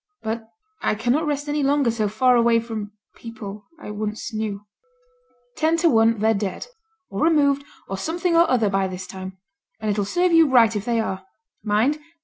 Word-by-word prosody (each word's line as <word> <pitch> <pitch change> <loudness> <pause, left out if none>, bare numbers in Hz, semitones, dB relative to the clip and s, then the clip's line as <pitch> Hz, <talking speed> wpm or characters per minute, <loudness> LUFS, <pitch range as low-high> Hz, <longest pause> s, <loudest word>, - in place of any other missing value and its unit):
But 220 0 -4 0.3
I - - +1
cannot 245 +8 0
rest 290 0 -2
any 295 0 -1
longer 280 -3 +2
so 220 -2 -1
far 250 +5 +3
away 235 -1 +4
from 220 -3 -6 0.2
people 210 -3 -9
I 210 - -8
once 215 +2 -4
knew.' 210 -2 -4 0.9
'Ten 320 +1 +2
to 335 0 +3
one 225 -1 +4
they're 220 +2 +2
dead, 200 -2 -3 0.5
or 195 - -4
removed, 285 -3 +3 0.2
or 195 - -4
something 335 - -1
or 335 +1 +5
other 235 -4 +2
by 195 -1 +1
this 185 0 -6
time; 190 0 -8 0.4
and 215 0 -1
it'll 205 0 0
serve 355 - +1
you 330 -3 +5
right 230 -4 +5
if 205 0 -3
they 235 -1 +1
are. 190 -4 -3 0.4
Mind! 220 +8 +1
225 Hz, 180 wpm, -23 LUFS, 210-280 Hz, 0.9 s, or